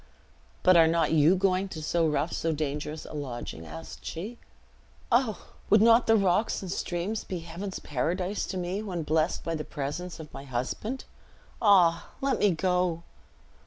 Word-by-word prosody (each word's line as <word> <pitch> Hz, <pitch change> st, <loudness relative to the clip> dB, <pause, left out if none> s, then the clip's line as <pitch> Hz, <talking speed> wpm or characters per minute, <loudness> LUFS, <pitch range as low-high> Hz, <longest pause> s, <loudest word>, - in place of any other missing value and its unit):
"But 185 Hz, -, +6 dB
are 165 Hz, -1 st, +7 dB
not 165 Hz, 0 st, +2 dB
you 160 Hz, +3 st, +5 dB
going 190 Hz, 0 st, +1 dB
to 155 Hz, -4 st, -7 dB
so 165 Hz, +1 st, +2 dB
rough, 150 Hz, +2 st, 0 dB
so 165 Hz, -, 0 dB
dangerous 150 Hz, +1 st, -3 dB
a -, -, -10 dB
lodging?" 120 Hz, -, -6 dB
asked 80 Hz, +1 st, -9 dB
she. 210 Hz, +9 st, -6 dB, 0.7 s
"O! 240 Hz, -3 st, +1 dB, 0.2 s
would 210 Hz, -, +6 dB
not 230 Hz, +2 st, +5 dB
rocks 200 Hz, -1 st, +3 dB
and 185 Hz, -, -5 dB
streams 185 Hz, +6 st, -2 dB
be 180 Hz, -3 st, -5 dB
Heaven's 175 Hz, +4 st, -6 dB
paradise 180 Hz, +8 st, -2 dB
to 190 Hz, -, -4 dB
me, 180 Hz, +3 st, -2 dB
when 180 Hz, -6 st, -4 dB
blessed 155 Hz, +2 st, +1 dB
by 165 Hz, -, -2 dB
the 155 Hz, -1 st, -3 dB
presence 150 Hz, +6 st, -5 dB
of 155 Hz, -2 st, -10 dB
my -, -, -7 dB
husband? 140 Hz, -, -4 dB, 0.6 s
Ah! 185 Hz, -6 st, +5 dB
let 275 Hz, 0 st, 0 dB
me 205 Hz, -, +4 dB
go!" 180 Hz, 0 st, 0 dB
175 Hz, 160 wpm, -28 LUFS, 155-195 Hz, 0.7 s, are